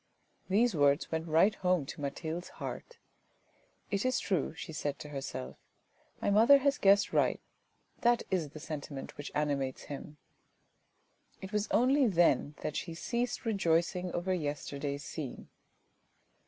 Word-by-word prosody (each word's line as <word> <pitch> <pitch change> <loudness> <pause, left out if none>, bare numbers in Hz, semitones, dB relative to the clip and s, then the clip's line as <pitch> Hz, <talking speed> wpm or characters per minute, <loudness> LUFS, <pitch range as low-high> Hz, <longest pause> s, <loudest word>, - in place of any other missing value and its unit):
These 225 +5 +3
words 145 -2 +3
went 160 +1 -2
right 165 +7 +4
home 180 -6 +1
to 140 - -8
Mathilde's 160 +5 -4
heart. 485 - -6 0.5
" - - -37
It 200 0 0
is 255 0 +1
true," 180 -5 -1
she 160 - -7
said 145 -2 -2
to 150 - -9
herself; 135 -2 -5 0.3
" - - -35
my - - +2
mother 230 +7 +7
has 280 +1 +1
guessed 200 +1 +4
right. - - +2 0.6
That 240 0 +3
is 170 -6 0
the 155 - -10
sentiment 150 -3 -6
which 145 - -7
animates 140 -3 -1
him." 145 +1 -8 1.2
It 190 - -8
was 210 0 0
only 265 +2 +4
then 165 - +3
that 150 - -3
she 165 -2 -4
ceased 245 +7 -2
rejoicing 180 -3 +1
over 180 +2 -1
yesterday's 145 -3 -3
scene. 145 -6 -6
170 Hz, 145 wpm, -32 LUFS, 145-210 Hz, 1.2 s, mother